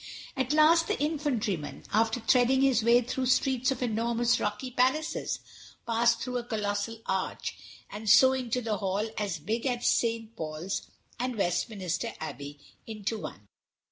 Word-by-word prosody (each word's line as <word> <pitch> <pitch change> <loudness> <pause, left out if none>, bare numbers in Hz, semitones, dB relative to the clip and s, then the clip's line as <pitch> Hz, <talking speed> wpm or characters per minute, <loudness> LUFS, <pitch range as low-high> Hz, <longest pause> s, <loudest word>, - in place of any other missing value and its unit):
At 260 -1 -1
last 320 +2 +5
the - - -1
Infantryman, 255 - -2
after 225 +2 +2
threading 250 +3 +3
his 255 -5 +3
way 235 +2 +5
through 250 +2 -2
streets 260 0 +2
of 265 -1 -1
enormous 235 +1 +1
rocky 260 -1 -3
palaces, 265 +7 0 0.5
passed 235 0 +2
through 250 -1 -2
a - - -6
colossal 220 0 -3
arch, 190 -1 -2 0.3
and 210 +1 -5
so 260 +5 +7
into 250 -1 -1
a - - -1
hall 195 +2 -1
as 200 -5 -2
big 225 - -2
as 245 -1 -1
St. 230 -1 +1
Paul's 160 +1 -4 0.3
and 250 0 -2
Westminster 185 -2 -1
Abbey 145 -2 -7 0.3
into 215 0 -3
one. 100 - -8
230 Hz, 145 wpm, -29 LUFS, 205-255 Hz, 0.5 s, so